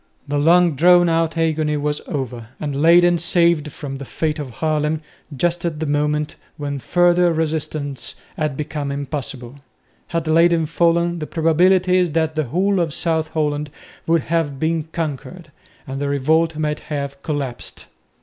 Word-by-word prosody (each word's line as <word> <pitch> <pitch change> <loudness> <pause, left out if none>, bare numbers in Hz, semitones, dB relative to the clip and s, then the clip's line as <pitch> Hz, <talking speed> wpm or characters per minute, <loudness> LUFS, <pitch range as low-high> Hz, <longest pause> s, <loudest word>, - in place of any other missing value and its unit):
The 145 0 0
long 170 +1 +4
drawn 175 +3 +5
out 165 0 0
agony 155 -2 +1
was 150 0 -2
over 125 -5 -4
and 145 -2 -3
Leyden 175 +1 +5
saved 170 -2 +2
from 135 -2 -6
the - - -6
fate 155 +3 -2
of 145 -3 -5
Haarlem, 155 +1 -1 0.4
just 175 +3 0
at 165 -3 -2
the 160 - -2
moment 150 +1 -1 0.2
when 145 -1 -4
further 175 +5 +3
resistance 155 -4 -3 0.2
had 150 -3 -2
become 150 -1 -3
impossible. 140 -2 -5 0.5
Had 165 -1 -2
Leyden 165 +1 +4
fallen 170 +1 +1
the 155 - -5
probability 180 +3 +3
is 180 -4 +1
that 160 -1 +1
the 155 -1 -1
whole 185 +8 +1
of 165 -4 -1
South 160 -2 0
Holland 150 -1 -1 0.4
would 165 -1 +3
have 155 -4 -1
been 160 0 0
conquered, 165 +2 -5 0.3
and 135 +1 -5
the 140 - -1
revolt 155 +3 +1
might 150 -1 -1
have 140 -2 -5
collapsed. 140 -5 -4
155 Hz, 155 wpm, -20 LUFS, 145-170 Hz, 0.5 s, drawn